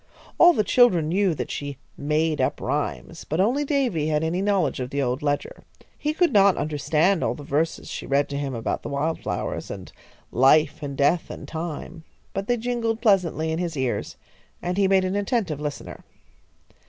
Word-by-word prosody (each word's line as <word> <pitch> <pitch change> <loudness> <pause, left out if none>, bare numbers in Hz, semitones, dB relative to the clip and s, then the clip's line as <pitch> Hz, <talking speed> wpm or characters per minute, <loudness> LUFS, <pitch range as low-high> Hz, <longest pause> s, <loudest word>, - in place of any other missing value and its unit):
All 350 +1 +8
the 215 - +2
children 190 -10 +4
knew 190 -1 +2
that - - -4
she 145 -2 -5 0.2
"made 155 +1 0
up - - 0
rhymes," - - -3
but 160 - -3
only 245 +10 +2
Davy 260 - 0
had 155 0 +1
any 170 +3 0
knowledge 195 -8 +1
of 125 -1 -3
the 140 +1 -3
old 130 +1 0
ledger. 145 -1 -2 0.3
He 300 - -1
could 340 +2 +2
not 200 -2 +5
understand 155 +5 +1
all - - 0
the 145 - -9
verses 150 +4 -1
she - - -6
read 140 +1 +2
to 140 - -3
him 135 -3 -3
about 115 - -2
the - - -6
wild 150 +3 -1
flowers, - - -4
and - - -8 0.4
life 145 +6 +4
and 140 -2 -5
death 150 +4 +2
and - - -8
time, 165 0 -6 0.3
but 195 +1 -3
they 245 - +2
jingled 230 -1 -1
pleasantly 180 -8 +2
in 160 - -1
his 170 -4 -3
ears, 130 -2 -2 0.4
and 180 +1 -2
he 195 0 +3
made 190 -1 +3
an 185 +1 -1
attentive 200 - -1
listener. 150 -1 -6
165 Hz, 190 wpm, -24 LUFS, 145-200 Hz, 0.4 s, All